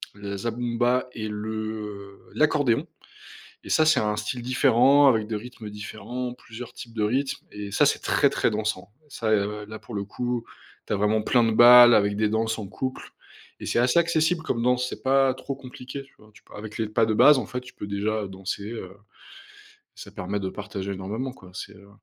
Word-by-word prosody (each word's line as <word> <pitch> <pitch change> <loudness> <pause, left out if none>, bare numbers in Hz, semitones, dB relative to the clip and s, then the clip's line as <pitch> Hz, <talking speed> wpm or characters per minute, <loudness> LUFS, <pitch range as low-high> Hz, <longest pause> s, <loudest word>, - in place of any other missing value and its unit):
le 100 -1 -6
zabumba 120 +3 0
et 110 -1 -4
le, 105 +1 -4
heu, 105 -2 -6 0.2
l'accordéon 145 -6 +2 0.8
et - - -9
ça, 155 -1 +4
c'est 155 -5 +4
un 105 0 0
style 120 +4 -4
différent 130 +2 +4
avec 110 -4 +2
des 110 -1 -3
rythmes 115 -1 -9
différents, 110 +4 -6
plusieurs 120 0 -10
types 115 - -10
de 110 - -1
rythmes 130 +6 -1
et 105 -1 -6
ça, - - +4
c'est - - +1
très, - - +3
très - - +1
dansant, 105 -3 -3 0.2
ça, 115 -6 -3
heu, 105 0 0
là 110 0 -8
pour 110 +1 -10
le 100 -1 -2
coup. 120 +3 -3 0.4
Tu - - -4
as - - +1
vraiment 105 +2 +1
plein 120 +2 +3
de 115 - +1
bals 120 +1 +9
avec 100 0 +2
des 105 0 +2
danses 110 +1 -1
en 105 - -5
couple 130 +7 -5 0.5
et - - -7
c'est - - 0
assez 125 +6 +3
accessible 165 0 +2
comme 115 -7 -2
danse. 125 0 +2
C'est - - -8
pas 135 0 +3
trop 135 0 -6
compliqué, 130 +1 -9
tu 135 - -25
vois? 105 0 -19 0.3
Avec 110 0 -8
les 110 - -1
pas 110 0 +2
de 110 - 0
base, 145 +6 +7
en 120 - -3
fait, 125 - -4
tu 125 - -13
peux, 105 - -7
déjà, 105 +2 -1
heu, - - -6
danser, 95 +2 -5
heu, 95 -5 -7 1.1
ça 100 - -11
permet 100 +1 -3
de 95 - -2
partager 100 -1 -5
énormément, 105 +8 -4
quoi. 95 -7 -16
C'est, 105 - -7
heu 100 +1 -17
110 Hz, 205 wpm, -25 LUFS, 105-125 Hz, 1.1 s, bals